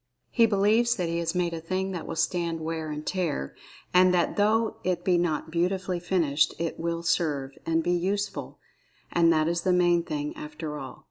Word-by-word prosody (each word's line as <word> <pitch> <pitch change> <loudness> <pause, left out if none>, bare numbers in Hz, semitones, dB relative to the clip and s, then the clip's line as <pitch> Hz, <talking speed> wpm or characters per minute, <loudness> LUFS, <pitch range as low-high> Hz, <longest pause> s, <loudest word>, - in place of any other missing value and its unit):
He 230 -2 +5
believes 220 +4 +3
that 175 -3 -2
he 170 0 -1
has 170 +1 -2
made 175 -1 0
a 165 - -4
thing 185 +3 -2
that 175 -3 -5
will 165 - -4
stand 165 +1 0
wear 160 0 -3
and 150 0 -5
tear, 170 - -2 0.4
and 180 0 +6
that 175 - +1
though 220 +2 +2
it 180 -1 -1
be 185 - +4
not[Pg 170 -3 +1
8] - - -13
beautifully 180 +1 0
finished, 165 -5 +1
it 165 0 -3
"will 170 0 -2
serve," 150 -5 0 0.2
and 165 0 +2
"be 175 - 0
useful." 195 +4 -2 0.5
And 170 -1 +4
that 155 -1 +2
is 170 0 0
the 185 - +1
main 175 -1 +4
thing, 295 - -4
after 295 - -6
all. 130 -2 -8
175 Hz, 200 wpm, -27 LUFS, 165-190 Hz, 0.5 s, and